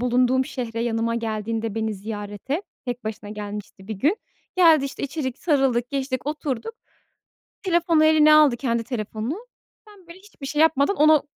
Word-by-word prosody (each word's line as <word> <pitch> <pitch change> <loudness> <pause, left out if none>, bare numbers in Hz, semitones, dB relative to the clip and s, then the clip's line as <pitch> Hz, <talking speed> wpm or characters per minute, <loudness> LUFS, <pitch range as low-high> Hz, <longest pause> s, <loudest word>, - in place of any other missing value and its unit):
bulunduğum 250 +1 +2
şehre 240 -5 -4
yanıma 230 0 0
geldiğinde 225 -1 -3
beni 220 -1 -1
ziyarete 205 - -5 0.2
tek 245 -1 -5
başına 215 -1 -6
gelmişti 210 -1 -8
bir 220 - -3
gün. 295 - +1 0.4
Geldi 325 -5 +6
işte 275 - -6
içeri, 280 -1 -2
sarıldık, 270 -7 +1
geçtik 265 -1 -2
oturduk. 295 - -3 0.9
Telefonu 340 -4 +3
eline 310 -1 +6
aldı 300 -5 +6
kendi 235 -3 -1
telefonunu, 235 - -4 0.4
ben 395 -4 -17
böyle 340 +2 -12
hiçbir 380 -8 -11
şey 295 +2 -1
yapmadan 320 +4 +3
ona 305 0 +5
260 Hz, 150 wpm, -23 LUFS, 225-305 Hz, 0.9 s, Geldi